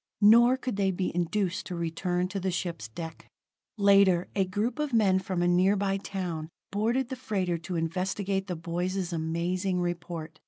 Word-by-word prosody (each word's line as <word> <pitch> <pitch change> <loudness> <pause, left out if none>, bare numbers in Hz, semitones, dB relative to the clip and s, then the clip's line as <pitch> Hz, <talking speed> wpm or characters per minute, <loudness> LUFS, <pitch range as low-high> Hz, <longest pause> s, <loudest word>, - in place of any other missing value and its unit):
Nor 235 +4 +7
could 255 -5 -4
they 195 -1 +2
be 185 0 -2
induced 180 +2 -1
to 180 - -4
return 175 +2 -1
to 195 +1 -3
the 190 0 -1
ship's 170 -5 -3
deck. 160 +9 -8 0.5
Later, 200 -3 +5
a 195 -2 +2
group 210 +9 -2
of 300 -3 -1
men 195 -5 +4
from 185 -2 -2
a - - +3
nearby 195 +2 +3
town 180 -5 -4 0.2
boarded 235 +5 0
the 260 - -3
freighter 190 -8 -1
to 175 +2 -5
investigate 190 +4 -1
the 180 - -3
boys' 175 +2 -2
amazing 175 +3 -1
report. 170 -2 -4
185 Hz, 165 wpm, -28 LUFS, 175-200 Hz, 0.5 s, Nor